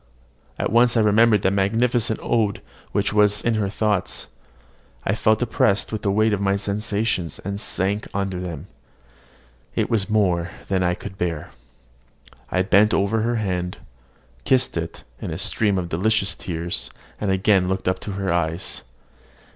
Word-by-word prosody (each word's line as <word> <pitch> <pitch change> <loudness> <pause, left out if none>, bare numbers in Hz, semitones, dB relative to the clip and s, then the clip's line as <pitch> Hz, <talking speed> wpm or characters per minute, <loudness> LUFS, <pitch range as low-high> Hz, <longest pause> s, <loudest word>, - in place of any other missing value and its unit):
at - - -1
once 120 +1 +4
I - - +5
remembered 105 0 +4
the 95 - +3
magnificent 110 +3 +1
ode 110 -4 0 0.3
which 100 0 0
was 105 -1 +3
in 120 - +2
her 105 -3 0
thoughts: 105 -2 -1 0.8
I 95 - +1
felt 110 +1 +2
oppressed 105 -3 +1
with 110 -1 -3
the 100 - 0
weight 110 +2 +3
of 100 - -1
my 100 0 +2
sensations, 100 -3 -1
and 100 +1 -5
sank 100 +3 0
under 95 -2 -2
them. 85 -3 -6 1.1
It - - 0
was 110 -3 +1
more 90 -5 +2 0.2
than 95 -1 +1
I 90 0 +1
could 95 0 -9
bear. 85 -3 -2 1.0
I 90 - +1
bent 105 +2 +4
over 100 +3 +1
her 120 +2 0
hand, 90 -5 -2 0.7
kissed 130 - +2
it 85 0 -4 0.2
in - - -4
a 80 - -4
stream 105 0 0
of 90 -2 -2
delicious 100 +4 +1
tears, 85 -1 -3 0.3
and 105 - -1
again 95 -1 +3
looked 95 0 -2
up 95 0 +1
to 105 - -6
her 95 -2 -1
eyes. 85 +1 -1
100 Hz, 160 wpm, -23 LUFS, 95-110 Hz, 1.1 s, I